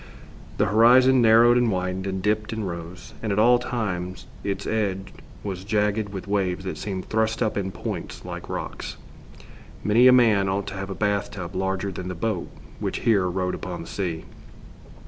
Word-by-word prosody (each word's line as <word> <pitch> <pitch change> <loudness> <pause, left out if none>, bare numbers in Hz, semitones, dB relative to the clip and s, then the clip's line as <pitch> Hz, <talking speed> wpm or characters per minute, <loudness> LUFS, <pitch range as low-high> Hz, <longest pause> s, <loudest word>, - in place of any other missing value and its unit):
The - - +3
horizon 125 +5 +6
narrowed 120 +2 +6
and 120 -2 +2
widened, 90 0 -2
and 95 -1 -3
dipped 105 +1 0
and 110 -3 -3
rose, 85 +4 -8
and 110 - -2
at 100 - 0
all 120 +3 +5
times 90 -7 -3 0.2
its 100 0 -3
edge 100 -3 -2 0.3
was 95 -2 -4
jagged 105 0 0
with 100 -1 -7
waves 95 -2 0
that 95 - -4
seemed 95 -3 -4
thrust 110 +1 +1
up 110 -1 -1
in 95 -1 -2
points - - -6
like - - -7
rocks. - - -5 0.9
Many 115 +4 +5
a - - +9
man 110 -6 +4
ought 100 +1 -1
to - - -8
have 95 0 -5
a 95 - -4
bath 105 -1 0
tub 90 -2 -7
larger 95 +1 -1
than 90 0 -6
the 90 - -4
boat 95 0 -2 0.3
which - - -3
here 100 -6 +3
rode 90 0 -1
upon 90 -1 -5
the - - -11
sea. 85 -5 -3
100 Hz, 185 wpm, -24 LUFS, 95-110 Hz, 0.9 s, a